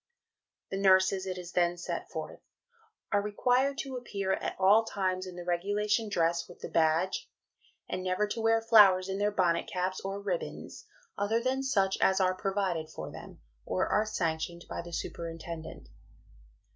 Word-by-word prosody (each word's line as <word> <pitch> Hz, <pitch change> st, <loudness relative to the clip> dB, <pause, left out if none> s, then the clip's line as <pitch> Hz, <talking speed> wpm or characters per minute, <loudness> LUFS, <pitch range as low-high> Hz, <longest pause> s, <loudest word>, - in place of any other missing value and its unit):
The 195 Hz, -, -2 dB
nurses, 190 Hz, 0 st, +4 dB
it 185 Hz, -1 st, -3 dB
is 175 Hz, -1 st, -8 dB
then 175 Hz, 0 st, +1 dB
set 170 Hz, -, -5 dB
forth, -, -, -6 dB, 0.7 s
"are 205 Hz, -, +3 dB
required 250 Hz, +7 st, +1 dB
to 265 Hz, -2 st, -6 dB
appear 200 Hz, -6 st, -2 dB
at -, -, -3 dB
all 200 Hz, +4 st, +6 dB
times 185 Hz, -3 st, -2 dB
in 180 Hz, -, -8 dB
the 175 Hz, -1 st, -7 dB
regulation 205 Hz, +5 st, 0 dB
dress 170 Hz, -2 st, 0 dB
with 175 Hz, -, -13 dB
the -, -, -7 dB
badge, 165 Hz, +3 st, +1 dB, 0.6 s
and 185 Hz, 0 st, -4 dB
never 185 Hz, +3 st, +1 dB
to 225 Hz, -, -3 dB
wear 225 Hz, 0 st, +3 dB
flowers 200 Hz, -5 st, +6 dB
in 190 Hz, +1 st, -2 dB
their 205 Hz, 0 st, +2 dB
bonnet 180 Hz, -4 st, +1 dB
caps, 185 Hz, 0 st, -1 dB
or 195 Hz, +1 st, -4 dB
ribbons, 470 Hz, -, -5 dB, 0.3 s
other 210 Hz, +3 st, +1 dB
than 260 Hz, +2 st, 0 dB
such 200 Hz, -8 st, +1 dB
as 190 Hz, 0 st, +4 dB
are 185 Hz, -1 st, +3 dB
provided 185 Hz, -4 st, -2 dB
for -, -, -7 dB
them, -, -, -11 dB, 0.2 s
or 90 Hz, -, 0 dB
are 215 Hz, +1 st, +2 dB
sanctioned 170 Hz, -3 st, -2 dB
by -, -, -4 dB
the 175 Hz, 0 st, -10 dB
superintendent." 165 Hz, -, -6 dB
190 Hz, 165 wpm, -30 LUFS, 175-210 Hz, 0.7 s, all